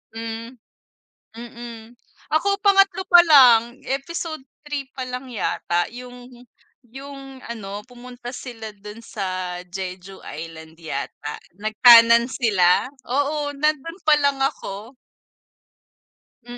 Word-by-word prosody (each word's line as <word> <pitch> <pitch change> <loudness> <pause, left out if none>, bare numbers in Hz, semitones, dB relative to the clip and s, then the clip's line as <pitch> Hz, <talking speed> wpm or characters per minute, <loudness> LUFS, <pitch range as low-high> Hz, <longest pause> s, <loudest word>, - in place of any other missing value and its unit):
Hmm, 230 +2 -6 0.8
mm. 235 -1 -10 0.4
Ako 395 +6 +2
3 390 -2 +4
pa 350 -1 +10
lang, 245 -5 +6
episode 315 +3 -4 0.3
3 290 -2 -4
pa 260 - -4
lang 250 +1 -6
yata 175 -6 -1
'yung, 245 0 -11 0.5
yung 270 +1 -11
ano 205 -3 -7
pumunta 245 0 -10
sila 240 -3 -8
dun 210 +2 -11
sa 185 -4 -4
Jeju 185 +1 -8
Island 160 +1 -9
yata 150 -2 -6 0.2
nagtanan 230 +2 +6
sila? 200 -9 +2 0.2
Oo, 290 +3 -1
nandun 305 +4 -1
pa 305 - +7
lang 280 -1 +2
ako. 220 -1 -4 1.5
Mm, 245 0 -10
240 Hz, 105 wpm, -22 LUFS, 210-275 Hz, 1.5 s, pa